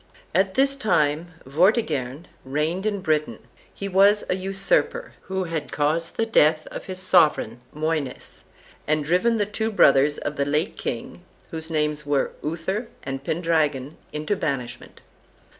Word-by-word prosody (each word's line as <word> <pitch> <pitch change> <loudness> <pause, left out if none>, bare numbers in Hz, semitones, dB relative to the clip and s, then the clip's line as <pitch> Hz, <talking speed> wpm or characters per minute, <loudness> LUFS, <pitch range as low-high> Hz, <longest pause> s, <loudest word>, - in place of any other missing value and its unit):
At 190 +2 +2
this 275 +1 +4
time 160 - +1 0.2
Vortigern 150 - +1 0.2
reigned 155 +9 -1
in 205 -2 -2
Britain. 155 -4 0 0.3
He 200 - -6
was 200 +2 +4
a - - +2
usurper, 195 - +1
who 190 0 -2
had 165 -4 -4
caused 155 +3 -1
the 225 - +2
death 155 -8 +3
of - - -7
his 185 -1 -6
sovereign, 155 -10 +3
Moines, 155 -3 -3 0.4
and 155 -1 +1
driven 185 +9 +2
the 205 - +1
two 220 +2 -2
brothers 145 -6 +5
of 145 - -4
the 140 - +1
late 150 +3 0
king, 120 +8 -5 0.3
whose 160 0 -5
names 150 -1 0
were 145 -1 0
Uther 175 +9 -3 0.2
and 135 0 -5
Pendragon, 155 -4 0 0.2
into 155 +7 -2
banishment. 135 -9 -4
160 Hz, 140 wpm, -24 LUFS, 150-190 Hz, 0.4 s, brothers